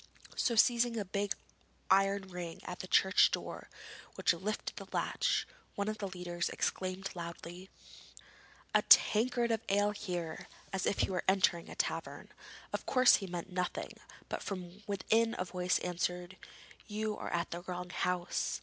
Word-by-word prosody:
So 235 - +1
seizing 235 +1 +4
the 215 -3 -2
big 200 +1 -1 0.6
iron 195 +1 +4
ring 180 -3 -6
on 180 - -4
the 185 - -6
church 190 +1 +5
door - - -5 0.5
which - - +3
lifted 195 +5 -4
the - - -7
latch, - - 0 0.3
one 200 0 -1
of 215 0 -2
the 200 - -2
leaders 180 -2 -3
exclaimed 185 +1 -2
loudly: 175 +2 -7 1.0
'A - - +5
tankard 235 +2 +6
of 225 - +1
ale 205 +1 +3
here!' 175 -6 -4 0.3
as 190 - 0
if 200 - +1
he - - +1
was 185 - 0
entering 185 -3 +3
a - - -8
tavern. - - -3 0.4
Of - - -3
course 255 -1 +6
he 195 - -6
meant 175 +1 -5
nothing, 180 0 -2 0.3
but - - -4
from 185 0 -6
within 220 +3 +2
a 185 - -1
voice 180 0 0
answered: 180 +1 -2 0.5
'You 215 0 -2
are - - -5
at 170 0 -1
the 170 - -4
wrong 180 0 -5
house.' 180 -1 -1
190 Hz, 160 wpm, -33 LUFS, 180-205 Hz, 1.0 s, tankard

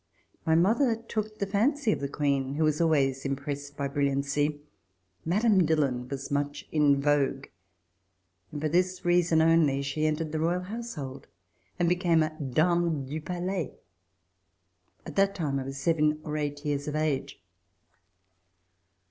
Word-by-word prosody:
My 160 - +4
mother 225 - +3
took 215 -1 -5
the 200 - -1
fancy 230 +6 +1
of - - -1
the 140 - -2
Queen, 140 -2 0
who 160 - +1
was 155 +1 +1
always 135 -5 +2
impressed 140 +1 -4
by 140 -1 -1
brilliancy. 140 +1 0 0.6
Madame 200 +2 +3
Dillon 140 -6 0
was 140 0 -5
much 145 0 -2
in 145 -2 +3
vogue, 140 -1 +1 1.1
and 150 - -5
for 155 - 0
this 180 +3 0
reason 175 -2 +3
only 160 -4 +3
she 155 +3 -1
entered 155 0 -2
the 155 - -2
Royal 170 +3 +1
household 180 - -6 0.5
and 175 -1 +1
became 175 -2 +3
a 155 - -2
Dame 160 +2 +1
du 150 +4 -5
Palais. 180 0 -3 1.3
At - - -9
that 195 0 +3
time 145 -5 -1
I 130 - -5
was 135 +1 -6
seven 150 +1 +1
or 150 -1 -4
eight 145 -1 -3
years 145 -1 -1
of 150 - -3
age. 140 -5 -1
155 Hz, 150 wpm, -28 LUFS, 140-175 Hz, 1.3 s, My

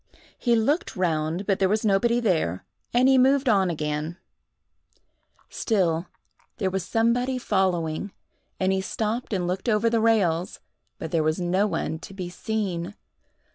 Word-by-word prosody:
He 240 -2 +1
looked 280 +10 0
round, 165 0 -1
but 195 -2 +1
there 190 -1 +3
was 215 +2 0
nobody 230 +4 +3
there, 160 - 0 0.3
and 250 +2 +4
he 265 -1 +5
moved 270 +1 +3
on 195 -5 +3
again; 150 +1 -3 1.3
still 180 -6 0 0.5
there 190 -4 -1
was 190 -1 -2
somebody 245 +3 +1
following, 190 -5 0 0.5
and 190 0 +2
he 190 - 0
stopped 220 +5 -3
and 185 -4 0
looked 190 +6 -2
over 220 +1 +2
the 230 -1 +2
rails; 190 -7 +1 0.4
but 160 - -6
there 165 - +2
was 155 +2 0
no 185 +4 +1
one 165 -3 -2
to 195 - -11
be 180 -2 -5
seen. 190 -1 -3
190 Hz, 150 wpm, -25 LUFS, 170-225 Hz, 1.3 s, he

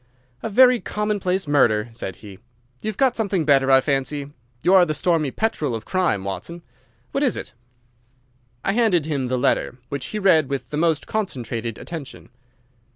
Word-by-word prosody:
"A - - -3
very 250 +3 +6
commonplace 205 -4 -1
little 145 - -6
murder," 110 0 +3
said 95 -4 -6
he. 100 -3 -12 0.4
"You've 215 -2 -4
got 260 -2 +3
something 195 -7 0
better, 135 -2 +4
I 135 0 +6
fancy. 140 +1 -2 0.3
You 185 - +4
are 190 -2 +8
the 155 -3 -1
stormy 165 -5 +1
petrel 155 - -1
of 110 - -7
crime, 180 - 0
Watson. 165 - -6 0.5
What 275 - -1
is 255 - +1
it?" - - -7 1.1
I - - +2
handed 200 -8 +2
him 140 -5 -2
the 130 +1 -1
letter, 125 0 0
which 140 -2 -4
he 215 - -4
read 165 -8 +3
with 140 -1 -4
the - - -3
most 160 -1 +1
concentrated 120 - -3
attention. 160 -5 -8
155 Hz, 170 wpm, -22 LUFS, 130-195 Hz, 1.1 s, are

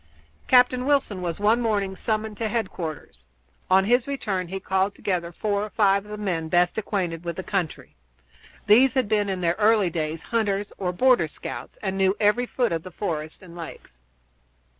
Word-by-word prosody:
Captain 250 0 +4
Wilson 275 -10 +1
was 175 0 -3
one 220 +4 +3
morning 200 -4 0
summoned 215 +1 -2
to 225 +1 -2
headquarters. 180 - -5 0.4
On 190 +1 +5
his 245 +4 +2
return 200 -10 -2
he 195 +2 -5
called 190 +1 0
together 175 -3 -2
four 205 +3 -1
or 215 - -5
five 200 -2 +2
of - - -14
the 210 - -6
men 175 -6 -2
best 175 +1 +3
acquainted 180 -6 -3
with 170 -1 -4
the 190 - -5
country. 180 -6 -3 0.7
These 255 +5 +5
had 260 -4 +2
been 205 -1 +1
in 190 -1 -2
their 170 0 +1
early 210 -4 +4
days 160 0 -3
hunters 205 -3 -1
or 180 -2 -1
border 245 -3 +3
scouts, - - -8
and 195 -1 -2
knew 190 +1 +2
every 220 +4 +2
foot 245 -2 0
of 165 -1 -1
the 185 - -9
forest 160 -3 -5
and 170 -2 -12
lakes. 160 - -10
195 Hz, 180 wpm, -24 LUFS, 175-220 Hz, 0.7 s, On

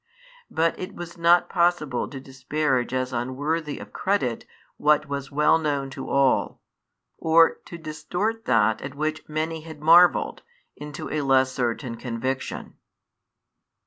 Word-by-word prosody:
But 165 0 0
it 185 +2 -6
was 175 -1 -8
not 170 +1 +4
possible 170 -7 +1
to 135 - -8
disparage 130 -1 -1
as 130 0 -2
unworthy 145 +6 -2
of - - -11
credit 135 - -1 0.3
what 150 0 +3
was 140 -1 -5
well 150 +3 +3
known 140 -3 -2
to - - -7
all, 135 -1 +2 0.6
or 165 +1 +4
to 170 - -9
distort 170 +8 -3
that 110 -3 +2
at 135 0 -7
which 155 +2 -3
many 160 +1 -2
had 160 -1 -10
marvelled 170 +3 +5 0.3
into 150 0 -7
a 155 - -1
less 130 -1 +3
certain 120 -1 -2
conviction. 130 +2 -4
150 Hz, 135 wpm, -24 LUFS, 130-165 Hz, 0.6 s, marvelled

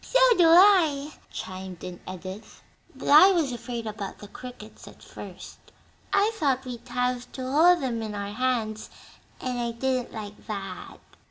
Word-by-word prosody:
"So - - +1 0.2
do 345 -4 +5
I," 325 -5 +5 0.2
chimed 185 -1 -7
in 180 -1 -7
Edith; 185 +3 -9 0.3
"but - - -8
I 310 +7 +9
was 320 -7 +1
afraid 240 -1 -5
about 210 -2 -6
the 205 - -11
crickets 235 -1 -11
at - - -14
first. - - -11 0.5
I 405 +2 +3
thought 275 - 0
we'd 245 -1 -8
have 250 0 -2
to 260 - -6
hold 320 +6 +4
'em 235 -3 -2
in 215 -2 -5
our 200 0 -5
hands, 225 -3 -1 0.5
and 250 -1 -3
I 235 -1 -2
didn't 255 +1 -1
like 210 -1 -9
that." 195 -3 -6
245 Hz, 160 wpm, -26 LUFS, 210-280 Hz, 0.5 s, I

